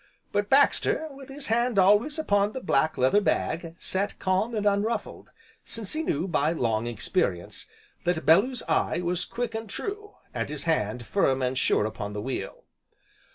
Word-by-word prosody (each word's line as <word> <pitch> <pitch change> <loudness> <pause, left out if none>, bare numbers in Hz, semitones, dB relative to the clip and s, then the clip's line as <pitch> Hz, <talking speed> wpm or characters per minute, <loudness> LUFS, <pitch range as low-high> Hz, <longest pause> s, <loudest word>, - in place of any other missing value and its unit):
But 205 0 0
Baxter, 285 +3 +3
with 275 0 -12
his 275 +1 -6
hand 235 0 +1
always 210 - +4
upon 205 -9 +1
the 260 - -4
black 155 - +1
leather 130 +11 +4
bag, 165 -4 -1
sat 195 +2 -3
calm 190 +5 0
and 210 -1 -1
unruffled, 205 +2 -1 0.3
since 220 -4 -2
he 310 - -1
knew, 175 - -1
by 155 -2 +1
long 115 -6 0
experience, 105 - -2 0.4
that 175 -2 -1
Bellew's 225 +10 +4
eye 160 +1 +1
was 175 0 -1
quick 240 -1 -4
and 220 -1 -5
true, 415 - -5 0.2
and - - -3
his 150 -1 -5
hand 120 -7 -1
firm 135 -8 +1
and 125 +1 0
sure 115 - +2
upon 105 -1 -5
the 105 - -4
wheel. 130 +1 -5
190 Hz, 165 wpm, -27 LUFS, 140-230 Hz, 0.4 s, always